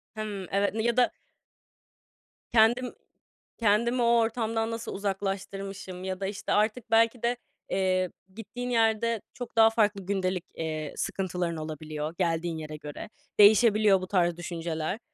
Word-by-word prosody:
Hımm, 205 Hz, -4 st, -5 dB
evet, 200 Hz, +1 st, +1 dB
n 220 Hz, 0 st, -1 dB
ya 235 Hz, +1 st, +1 dB
da 250 Hz, -, +4 dB, 1.4 s
Kendim 240 Hz, +2 st, +4 dB, 0.6 s
kendimi 235 Hz, +3 st, +2 dB
o 235 Hz, 0 st, +4 dB
ortamdan 225 Hz, 0 st, 0 dB
nasıl 230 Hz, 0 st, -5 dB
uzaklaştırmışım 195 Hz, -1 st, -4 dB
ya 190 Hz, 0 st, -3 dB
da, 195 Hz, -, -2 dB
işte, 200 Hz, 0 st, -4 dB
artık 220 Hz, +3 st, 0 dB
belki 230 Hz, +1 st, +3 dB
de, 240 Hz, +1 st, +1 dB, 0.3 s
eee, 185 Hz, -1 st, +1 dB, 0.2 s
gittiğin 245 Hz, +3 st, -6 dB
yerde 225 Hz, -1 st, +2 dB
çok 245 Hz, -2 st, -8 dB
daha 225 Hz, 0 st, +8 dB
farklı 205 Hz, -4 st, +1 dB
gündelik, 185 Hz, -2 st, -1 dB
eee, 155 Hz, -2 st, -4 dB
sıkıntıların 180 Hz, -3 st, -2 dB
olabiliyor, 155 Hz, 0 st, -5 dB
geldiğin 165 Hz, -1 st, 0 dB
yere 155 Hz, -1 st, -6 dB
göre. 150 Hz, +7 st, -8 dB, 0.3 s
Değişebiliyor 210 Hz, -2 st, +6 dB
bu 185 Hz, -, -5 dB
tarz 175 Hz, -3 st, +1 dB
düşünceler. 170 Hz, +2 st, -3 dB
200 Hz, 135 wpm, -28 LUFS, 180-225 Hz, 1.4 s, daha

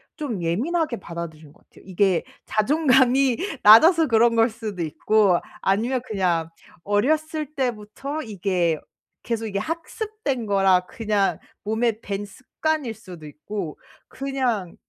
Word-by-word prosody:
좀 250 Hz, -, -4 dB
예민하게 260 Hz, -, 0 dB
받아들인 160 Hz, -4 st, -8 dB
것 -, -, -24 dB
같아요. -, -, -19 dB
이게 190 Hz, -1 st, +1 dB, 0.2 s
자존감이 260 Hz, 0 st, +3 dB, 0.3 s
낮아서 320 Hz, -, +8 dB
그런 230 Hz, -1 st, +4 dB
걸 225 Hz, +1 st, +4 dB
수도 215 Hz, -5 st, -6 dB
있고, 195 Hz, +4 st, +2 dB, 0.2 s
아니면 235 Hz, +6 st, +1 dB
그냥 175 Hz, -7 st, 0 dB, 0.3 s
어렸을 305 Hz, +8 st, 0 dB
때부터 260 Hz, +4 st, -3 dB
이게 180 Hz, -6 st, -1 dB, 0.4 s
계속 225 Hz, -1 st, -2 dB
이게 200 Hz, -2 st, -2 dB
학습된 330 Hz, -, -4 dB
거라 195 Hz, -3 st, +3 dB
그냥 210 Hz, -3 st, 0 dB, 0.2 s
몸에 220 Hz, +1 st, 0 dB
밴 200 Hz, -1 st, -4 dB
습관일 260 Hz, +4 st, -3 dB
수도 185 Hz, -7 st, -12 dB
있고. 160 Hz, +3 st, -6 dB, 0.3 s
그냥 255 Hz, -9 st, -2 dB
220 Hz, 260 characters per minute, -23 LUFS, 195-265 Hz, 0.4 s, 낮아서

